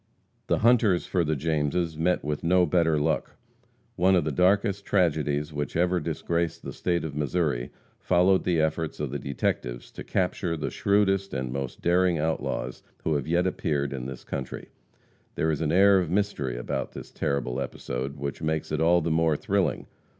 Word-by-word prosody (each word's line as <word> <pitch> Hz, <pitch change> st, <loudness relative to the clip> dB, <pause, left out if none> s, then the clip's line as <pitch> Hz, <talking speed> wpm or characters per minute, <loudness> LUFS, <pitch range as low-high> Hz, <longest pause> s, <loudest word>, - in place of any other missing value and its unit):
The -, -, +2 dB
hunters 110 Hz, -6 st, +3 dB
for 90 Hz, -2 st, +1 dB
the 80 Hz, -1 st, 0 dB
Jameses 80 Hz, +2 st, 0 dB
met 85 Hz, +3 st, +1 dB
with 75 Hz, 0 st, -2 dB
no 90 Hz, +1 st, +4 dB
better 80 Hz, -2 st, +2 dB
luck. 75 Hz, +2 st, -1 dB, 0.6 s
One 95 Hz, +2 st, +4 dB
of 90 Hz, -, +3 dB
the 75 Hz, -, -1 dB
darkest 100 Hz, -, +2 dB
tragedies 75 Hz, -6 st, +1 dB
which 75 Hz, 0 st, -3 dB
ever 90 Hz, +2 st, +2 dB
disgraced 85 Hz, +1 st, -2 dB
the -, -, -6 dB
state 85 Hz, -1 st, -1 dB
of 75 Hz, -3 st, -5 dB
Missouri 75 Hz, -4 st, -1 dB, 0.3 s
followed 95 Hz, +1 st, +3 dB
the 85 Hz, -3 st, +1 dB
efforts 80 Hz, 0 st, -1 dB
of 75 Hz, -4 st, -3 dB
the 70 Hz, -, -3 dB
detectives -, -, -3 dB
to -, -, -8 dB
capture 90 Hz, -2 st, -1 dB
the -, -, -3 dB
shrewdest 100 Hz, -1 st, +1 dB
and 65 Hz, -1 st, -2 dB
most 70 Hz, -2 st, -5 dB
daring 90 Hz, 0 st, +3 dB
outlaws 75 Hz, -5 st, -2 dB, 0.2 s
who 80 Hz, -, +1 dB
have 70 Hz, -2 st, -1 dB
yet 85 Hz, +2 st, +2 dB
appeared 70 Hz, -6 st, -1 dB
in 65 Hz, -1 st, -5 dB
this 65 Hz, -2 st, -8 dB
country. 65 Hz, -2 st, -6 dB, 0.7 s
There 80 Hz, -, +1 dB
is 75 Hz, -, -2 dB
an 75 Hz, -1 st, 0 dB
air 100 Hz, +2 st, +6 dB
of 90 Hz, -3 st, -2 dB
mystery 85 Hz, -10 st, -1 dB
about -, -, -3 dB
this -, -, -9 dB
terrible 65 Hz, -2 st, -2 dB
episode 65 Hz, +2 st, -4 dB
which 70 Hz, +2 st, -5 dB
makes 80 Hz, -1 st, -2 dB
it 75 Hz, 0 st, 0 dB
all 85 Hz, +2 st, +4 dB
the 80 Hz, +1 st, -1 dB
more 80 Hz, -1 st, +2 dB
thrilling. 95 Hz, -6 st, 0 dB
80 Hz, 180 wpm, -26 LUFS, 70-90 Hz, 0.7 s, air